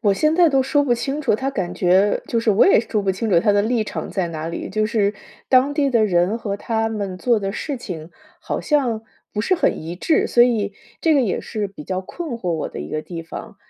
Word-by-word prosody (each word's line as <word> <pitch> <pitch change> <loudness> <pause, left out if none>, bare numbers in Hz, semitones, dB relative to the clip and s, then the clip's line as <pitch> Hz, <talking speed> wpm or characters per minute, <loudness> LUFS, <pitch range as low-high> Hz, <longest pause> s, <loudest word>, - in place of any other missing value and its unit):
我 205 -4 +3
现 305 +8 +2
在 345 -1 +5
都 270 -2 +3
说 285 +2 +2
不 250 -4 +2
清 275 +5 -3
楚， 265 -7 +2
它 265 +5 -2
感 190 -9 -3
觉 190 +3 +3
就 230 - 0
是 225 - +2
我 205 - +5
也 385 - +6
说 215 -3 -2
不 190 -1 +1
清 220 +4 -3
楚 175 -4 +4
它 205 +4 +3
的 205 - +3
立 220 +1 0
场 - - -5
在 185 -4 -1
哪 160 0 -5
里。 170 - -5
就 215 +1 +1
是 210 -2 +1 0.4
当 265 +2 +4
地 285 -3 +2
的 225 -3 +3
人， 180 +4 +1
和 200 -3 -3
他 225 +1 -1
们 200 -4 -4
做 235 0 +2
的 195 -1 -3
事 285 +4 -4
情， 175 -8 -7 0.3
好 - - -3
像 250 -7 +1 0.3
不 210 - 0
是 370 - +2
很 - - +1
一 165 +2 -6
致， 310 - +1
所 240 - +5
以 220 -5 +1 0.3
这 325 - +4
个 285 - +4
也 215 -7 0
是 210 -2 -3
比 170 -6 -11
较 185 0 -2
困 320 - -7
惑 180 - -4
我 160 - -2
的 - - -7
一 75 - -6
个 155 - -2
地 170 -2 -7
方。 210 +6 -9
215 Hz, 270 characters per minute, -21 LUFS, 190-255 Hz, 0.4 s, 也